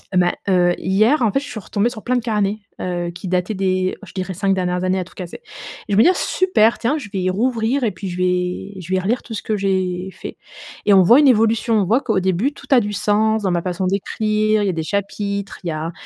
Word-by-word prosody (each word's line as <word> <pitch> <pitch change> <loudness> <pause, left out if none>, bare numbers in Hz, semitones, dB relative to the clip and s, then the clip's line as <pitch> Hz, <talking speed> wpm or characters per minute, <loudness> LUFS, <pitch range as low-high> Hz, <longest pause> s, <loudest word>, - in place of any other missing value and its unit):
Mais, 175 -1 +3 0.2
heu, 175 -1 +3
hier, 215 +10 +2
en 225 -4 +3
fait, 275 - +1
je 285 - -8
suis 240 - -6
retombée 205 +3 -1
sur 230 -3 -10
plein 250 - 0
de - - -1
carnets, 210 -2 -1 0.2
heu, 175 -1 -3
qui 180 +3 -8
dataient 180 +3 0
des 185 -1 0
je 185 - -14
dirais, 185 0 -4
5 195 +2 0
dernières 180 -1 -1
années, 185 +1 +1
à - - -2
tout - - -18
casser 180 - -8 0.5
et 205 - -2
je - - +3
vais 210 - +4
me - - +8
dire: 365 +5 +5
«Super, 235 - +2
tiens, 255 +6 0
je 260 -9 -8
vais 185 -1 0
rouvrir 235 +5 0
et 220 - +1
puis, 195 0 -7
je 175 - -6
vais 180 +2 -1
je 180 +2 -5
vais 185 - +3
relire 225 +7 0
tout 230 - -9
ce 215 - -5
que 215 - -1
j'ai 185 -2 -1
fait. 185 - -9 0.5
Et 205 - +5
on 190 - +7
voit 235 +10 +7
une 295 - +5
évolution. 225 0 +2
On - - 0
voit 230 +8 +2
qu'au 220 -7 0
début, 190 +10 0
tout - - -14
a 265 - +7
du 210 0 -3
sens 215 +1 +1
dans 190 - +1
ma 175 -1 0
façon 180 +1 -3
d'écrire, 215 +2 0
il - - 0
y - - +2
a - - -1
des 160 -1 -3
chapitres, 200 +2 -3
il - - -5
y - - -1
a 155 +1 -4
200 Hz, 265 wpm, -20 LUFS, 185-220 Hz, 0.5 s, me